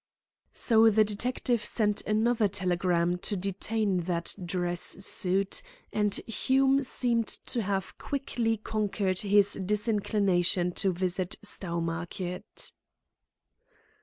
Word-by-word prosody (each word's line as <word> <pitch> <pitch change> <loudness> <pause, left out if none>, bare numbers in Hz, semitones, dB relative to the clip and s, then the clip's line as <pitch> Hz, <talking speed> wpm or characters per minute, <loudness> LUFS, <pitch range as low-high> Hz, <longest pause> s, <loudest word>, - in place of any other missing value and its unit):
So 225 -1 +5
the 215 0 +4
detective 235 +2 -1
sent 210 -2 0
another 220 +1 +2
telegram 180 -2 0
to 205 +2 -2
detain 200 +1 -1
that 170 -1 0
dress 175 0 -2
suit, 195 - +1 0.3
and 210 -1 +1
Hume 270 +4 +2
seemed 240 -3 0
to 235 - -2
have 195 -2 -3
quickly 240 -5 -2
conquered 200 -3 -1
his 205 0 +4
disinclination 200 -4 +1
to 195 +2 0
visit 180 +1 -2
Stowmarket. 175 -1 -4
200 Hz, 100 wpm, -28 LUFS, 180-220 Hz, 0.3 s, So